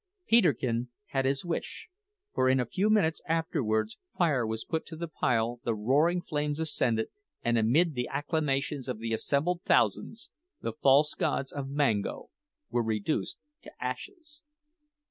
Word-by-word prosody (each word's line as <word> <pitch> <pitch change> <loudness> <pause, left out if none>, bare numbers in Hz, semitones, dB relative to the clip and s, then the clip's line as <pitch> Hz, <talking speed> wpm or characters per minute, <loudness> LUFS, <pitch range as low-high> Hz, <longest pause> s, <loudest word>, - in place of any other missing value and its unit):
Peterkin 130 - +3 0.2
had 135 -1 0
his 135 +4 0
wish, 170 -1 -4 0.5
for 130 - +3
in 130 0 +4
a 125 - +1
few 190 - 0
minutes 185 -7 +3
afterwards 160 - 0 0.2
fire 145 -10 +2
was 110 0 -4
put 160 - -2
to 165 - -8
the 170 +1 -4
pile, 120 -5 0
the 115 - 0
roaring 150 +11 +2
flames, 150 -2 -2
ascended, 120 -8 0 0.3
and 120 0 +2
amid 140 +10 +3
the 125 -2 -2
acclamations 145 -2 -1
of 125 -3 -3
the 115 +1 -3
assembled 155 +10 0
thousands, 110 - +1 0.3
the 115 - -3
false 140 +5 +4
gods 135 - -1
of 140 -2 -5
Mango 140 -8 0 0.4
were 120 - +2
reduced 110 - -1 0.2
to - - -12
ashes! 315 -6 -6
140 Hz, 145 wpm, -29 LUFS, 120-160 Hz, 0.5 s, in